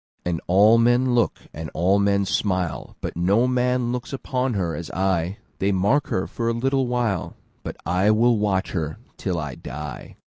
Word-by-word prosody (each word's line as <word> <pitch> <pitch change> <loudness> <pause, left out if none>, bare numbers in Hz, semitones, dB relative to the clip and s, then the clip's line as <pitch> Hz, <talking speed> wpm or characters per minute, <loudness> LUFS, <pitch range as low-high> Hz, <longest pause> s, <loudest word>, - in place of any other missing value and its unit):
And 85 -2 -1
all 105 +5 +6
men 120 +2 +3
look, 120 -2 +2 0.2
and 80 0 -6
all 95 +4 +3
men 100 0 +2
smile, 90 -4 -1
But - - -4
no 100 +8 +3
man 125 -1 +1
looks 125 +2 -4 0.2
on 125 -2 +1
her 85 -5 -1
as 85 +1 -6
I:They 95 +2 -1
mark 100 +10 +2
her 95 - -1
for 115 -1 -2
a - - +1
little 135 +2 0
while, 120 -7 -1 0.3
But - - -7
I 95 +3 +2
will 115 +1 +4
watch 100 -2 0
her 80 -3 -3 0.2
till 90 -3 -2
I 75 -4 -4
die. 75 +2 -8
100 Hz, 175 wpm, -23 LUFS, 90-120 Hz, 0.3 s, all